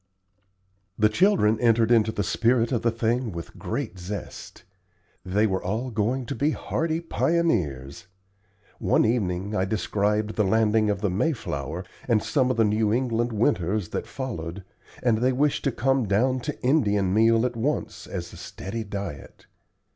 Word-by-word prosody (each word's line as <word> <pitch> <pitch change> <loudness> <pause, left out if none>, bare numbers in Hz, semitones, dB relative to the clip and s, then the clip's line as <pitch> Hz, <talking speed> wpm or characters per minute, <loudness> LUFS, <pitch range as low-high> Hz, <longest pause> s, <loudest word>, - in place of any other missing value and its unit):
The 105 0 +4
children 115 - +3
entered 115 -1 +3
into 110 -2 +4
the 100 - -2
spirit 115 +5 +2
of 120 - 0
the 115 - +2
thing 115 +1 -1
with 85 -2 -8
great 95 - -4
zest. 95 +2 -7 0.6
They 100 +4 +1
were 95 -3 -1
all 115 +7 -2
going 120 +4 -1
to - - -4
be 145 +6 +1
hardy 160 0 -2
pioneers. 95 - -1 0.7
One - - +3
evening 100 -3 -1
I 95 - +1
described 105 +2 -1
the 105 - +3
landing 110 +1 +2
of 100 -1 -1
the 100 -3 0
"Mayflower," 90 - -2 0.2
and 115 -4 +2
some 130 -4 +1
of 130 - 0
the 115 - +5
New 105 0 +2
England 120 0 0
winters 105 - 0
that - - -4
followed, 100 -9 -5 0.4
and 115 -3 +3
they 125 +2 +2
wished 145 +3 +1
to 135 - +2
come 135 -1 +1
down 125 +7 +2
to 150 +4 -5
Indian 105 -9 +2
meal 115 +2 +4
at 125 - -2
once 135 +7 -2
as - - -6
a - - -10
steady 110 +4 -6
diet. 100 -8 -7
110 Hz, 160 wpm, -25 LUFS, 100-125 Hz, 0.7 s, the